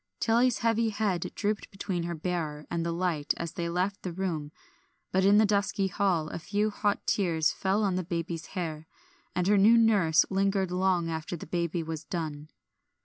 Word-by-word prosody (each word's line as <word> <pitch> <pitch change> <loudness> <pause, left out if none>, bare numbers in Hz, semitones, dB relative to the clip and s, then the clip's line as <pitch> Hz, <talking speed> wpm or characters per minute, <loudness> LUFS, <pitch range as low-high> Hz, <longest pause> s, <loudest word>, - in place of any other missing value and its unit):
Tilly's 240 +1 +3
heavy 230 0 +1
head 205 -5 -1
drooped 210 0 -2
between 195 -3 -3
her 170 0 -3
bearer 160 -3 -3
and 170 -1 -1
the 170 - -1
light 170 -4 -1
as 170 -1 -4
they 170 0 -3
left 185 +4 -1
the 180 - -4
room, 165 -5 -3 0.6
but 190 +1 +2
in 200 +2 +6
the 215 - +6
dusky 200 -1 +1
hall 180 -5 +1
a - - -5
few 205 +5 0
hot 205 0 -1
tears 165 -6 +2
fell 195 +3 0
on 190 -3 +1
the 185 - -1
baby's 165 -1 -4
hair, 160 -3 -4 0.5
and 180 - +1
her 205 +1 +4
new 220 +4 +7
nurse 200 -8 +4
lingered 195 -1 +1
long 180 -2 +1
after 160 +2 -4
the 160 - -9
lullaby 170 -1 0
was 160 -1 -5
done. 155 -4 -5
180 Hz, 185 wpm, -29 LUFS, 165-200 Hz, 0.6 s, new